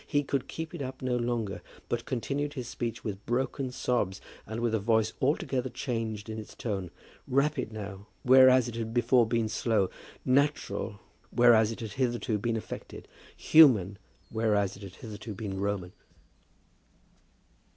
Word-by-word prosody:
He 145 0 +1
could 140 -1 -2
keep 160 +1 -6
it 170 - -5
up 130 -1 -6
no 125 -1 +1
longer, 120 -4 -2 0.3
but - - -2
continued 140 +4 -2
his 125 -4 -4
speech 120 -1 -4
with 100 -2 -5
broken 130 +2 -1
sobs, 120 -6 -1 0.3
and 110 +2 -4
with 120 -1 0
a 110 - +2
voice 110 +1 +2
altogether 135 -2 0
changed 115 -5 -3
in 110 0 -5
its 110 - -10
tone, 100 -6 -3 0.4
rapid 140 -2 +1
now, 100 -2 -7 0.2
whereas 130 -1 +7
it 120 - -5
had 115 0 -4
before 120 0 +4
been 115 -1 +1
slow, 110 -2 +1 0.3
natural, 135 -6 +1 0.3
whereas 115 -3 +5
it 115 - -7
had 110 -2 -5
hitherto 120 -2 -1
been 115 +2 0
affected, 110 - -8 0.3
human, 110 - +6 0.3
whereas 105 -3 +1
it 100 - -13
had 95 -2 -9
hitherto 110 -2 -8
been 95 -1 -4
Roman. 100 -3 -2
115 Hz, 150 wpm, -29 LUFS, 105-130 Hz, 0.4 s, whereas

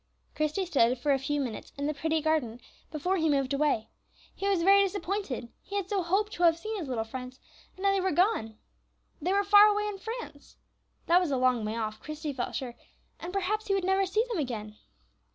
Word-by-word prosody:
Christie 305 +5 -1
stood 255 -7 +3
for 280 +4 0
a 270 - +1
few 290 +2 -1
minutes 245 -6 -5
in 285 - -2
the 300 - 0
pretty 320 +2 -1
garden 280 -8 0 0.3
before 355 +5 -1
he 320 -2 +1
moved 275 -2 +1
away. 280 -6 0 0.4
He 395 - -3
was 375 -4 +2
very 395 +2 +7
disappointed; 385 - -2
he 400 - -8
had 395 -1 -2
so 400 -2 +1
hoped 390 +5 0
to - - -6
have 335 -2 +5
seen 435 +5 -5
his 325 - -5
little 240 -4 -1
friends, 250 +3 -8 0.4
and 375 - -10
now 395 - +4
they 390 -1 +1
were 380 - +1
gone. 305 - +1 0.6
They 355 +5 0
were 400 +1 +3
far 410 +1 +8
away 420 0 +1
in 415 -2 -4
France. 450 -10 -8 0.5
That 350 +2 +5
was 355 - -1
a 270 - 0
long 250 -3 +2
way 215 +1 -3
off, 215 -1 -3
Christie 305 -1 -5
felt 255 -2 -4
sure, 250 -3 -4 0.5
and 350 - -6
perhaps 405 +3 -1
he 395 - +2
would 385 -2 -1
never 385 0 +2
see 430 +5 +1
them 460 -8 -2
again. 215 -6 -4
325 Hz, 220 wpm, -29 LUFS, 265-390 Hz, 0.6 s, far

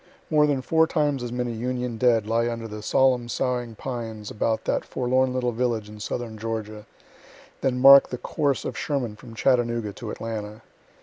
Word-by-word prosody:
More 150 -1 +5
than 135 -3 0
four 160 +2 +3
times 145 -5 0
as 120 -1 -4
many 125 0 -2
Union 125 0 -3
dead 115 -4 +3
lie 115 +2 +1
under 115 -1 -5
the 105 0 -7
solemn 125 +1 +2
soughing 120 -2 -2
pines 115 -4 -6
about 110 +1 -1
that - - 0
forlorn 130 +1 0
little 125 -1 0
village 115 -3 -1
in 105 0 -11
southern 110 0 -5
Georgia, 110 -1 -5 0.7
than 125 -2 0
mark 135 +1 +9
the 125 - -4
course 140 +2 -1
of - - -4
Sherman 130 -7 -2
from 115 +1 -13
Chattanooga 120 -4 +1
to 115 - -7
Atlanta. 110 -2 -6
120 Hz, 175 wpm, -25 LUFS, 110-130 Hz, 0.7 s, mark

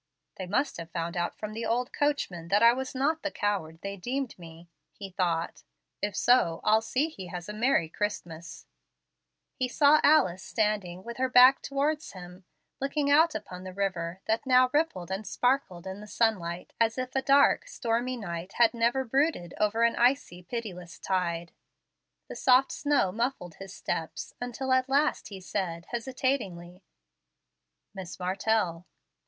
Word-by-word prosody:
"They 185 - -5
must 270 +10 0
have 165 -1 -7
found 170 0 -4
out 175 0 -2
from 215 0 -6
the 225 +2 -4
old 240 +2 -1
coachman 285 - -1
that 205 +5 +3
I 235 0 +8
was 265 +1 -5
not 305 +5 +1
the 300 - -2
coward 185 - -2
they 200 0 -5
deemed 255 +6 -3
me," 165 0 -12 0.2
he 195 -2 -9
thought. 170 -3 -1 0.4
"If 205 0 -2
so, 175 -10 +3
I'll 220 +1 +4
see 260 +7 0
he 195 - -9
has 175 -1 -7
a 210 - -5
merry 220 -5 +2
Christmas." 170 -4 -5 0.9
He 255 - -1
saw 290 +4 +4
Alice 190 - +4
standing 205 -5 -1
with 235 +2 -7
her 260 0 0
back 255 +2 +7
towards 295 +3 -2
him, 180 0 -11 0.3
looking 285 +1 0
out 320 +2 +5
upon 180 0 -7
the 185 -1 -8
river, 185 -3 -2
that 220 +1 0
now 255 0 +5
rippled 240 - 0
and 195 +2 -4
sparkled 245 -8 0
in 190 +1 -6
the 210 - -10
sunlight 185 -7 -1
as 225 +1 +2
if 255 0 -4
a 265 - +2
dark, 280 - +4
stormy 245 - -2
night 175 -3 -6
had 235 0 +4
never 235 +3 +1
brooded 265 - 0
over 215 +2 +2
an 235 - +3
icy, 240 -7 +1
pitiless 180 -4 -7
tide. 170 -3 -2 0.8
The - - -8
soft 260 +1 +4
snow 285 -10 +1
muffled 225 -6 -3
his 195 -1 -9
steps, 165 -3 -4
until 245 +2 -3
at 260 0 +2
last 285 +3 +1
he 195 -2 -8
said, 180 -3 -4
hesitatingly, 235 -8 -3 1.1
"Miss 185 -1 -8
Martell." 185 -2 -1
215 Hz, 160 wpm, -28 LUFS, 180-255 Hz, 1.1 s, I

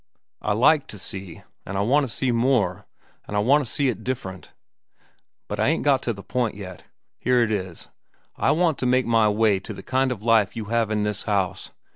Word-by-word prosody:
I 105 - 0
like 140 +7 +4
to 105 - -8
see, 95 -2 -6 0.2
an' 100 - -5
I - - +1
want 135 +5 +2
to - - -6
see 130 +2 -1
more, 115 -6 +1 0.4
an' 105 - -5
I - - +2
want 135 +8 +4
to 120 - -6
see 145 - +1
it 120 -7 -2
different. 95 -8 -5 1.0
"But - - -5
I - - +2
ain't 160 +3 +1
got 140 -3 +3
to 120 - -1
the 100 -3 -8
point 120 -5 -1
yet. 95 -3 -9 0.3
Here 125 0 +3
it 110 - -1
is. 95 -5 -4 0.5
I - - +1
want 165 -3 +2
to 125 - 0
make 130 +1 +3
my 115 -2 +3
way 105 -2 +2
to 95 - -8
the - - -10
kind 130 0 +1
of 110 -4 -5
life 110 -3 +3
you 110 - -4
have 115 -2 +2
in 105 -1 0
this 105 -1 -2
house. 95 -2 -1
115 Hz, 220 wpm, -24 LUFS, 100-130 Hz, 1.0 s, like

